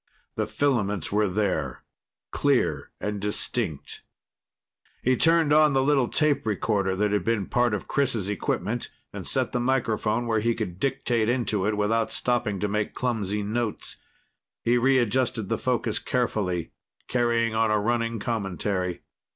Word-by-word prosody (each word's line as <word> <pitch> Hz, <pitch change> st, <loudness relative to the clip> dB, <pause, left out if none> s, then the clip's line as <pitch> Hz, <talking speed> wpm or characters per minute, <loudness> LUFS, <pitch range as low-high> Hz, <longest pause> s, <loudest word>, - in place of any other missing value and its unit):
The -, -, -2 dB
filaments 105 Hz, -, 0 dB
were 105 Hz, +1 st, +2 dB
there, 90 Hz, -, -1 dB, 0.5 s
clear -, -, +1 dB
and 105 Hz, -1 st, -3 dB
distinct. 105 Hz, -, -2 dB, 1.0 s
He 130 Hz, +1 st, +3 dB
turned 165 Hz, +1 st, +4 dB
on 155 Hz, -1 st, +5 dB
the 135 Hz, 0 st, +3 dB
little 135 Hz, -3 st, +3 dB
tape 150 Hz, +1 st, +2 dB
recorder 100 Hz, -2 st, 0 dB
that 105 Hz, +1 st, +1 dB
had 105 Hz, -, +1 dB
been 115 Hz, -4 st, 0 dB
part 120 Hz, -1 st, +1 dB
of 100 Hz, -, -6 dB
Chris' 120 Hz, -8 st, 0 dB
equipment 105 Hz, +3 st, -2 dB, 0.2 s
and -, -, -6 dB
set -, -, +1 dB
the 125 Hz, -, 0 dB
microphone 120 Hz, -2 st, 0 dB
where 110 Hz, -2 st, +1 dB
he 115 Hz, +2 st, +1 dB
could 95 Hz, -5 st, -4 dB
dictate 125 Hz, -4 st, 0 dB
into 115 Hz, -5 st, 0 dB
it 105 Hz, -1 st, 0 dB
without 110 Hz, +2 st, +1 dB
stopping 120 Hz, -5 st, 0 dB
to 105 Hz, -, +1 dB
make 105 Hz, +1 st, -2 dB
clumsy 105 Hz, -5 st, -1 dB
notes. 110 Hz, +1 st, -2 dB, 0.7 s
He 120 Hz, -, +3 dB
readjusted 125 Hz, -4 st, +1 dB
the -, -, 0 dB
focus 120 Hz, -3 st, 0 dB
carefully, 100 Hz, -8 st, -1 dB, 0.4 s
carrying 115 Hz, -2 st, +1 dB
on 110 Hz, 0 st, +2 dB
a 105 Hz, -, +3 dB
running 115 Hz, +2 st, 0 dB
commentary. 95 Hz, -4 st, -2 dB
110 Hz, 145 wpm, -26 LUFS, 105-120 Hz, 1.0 s, on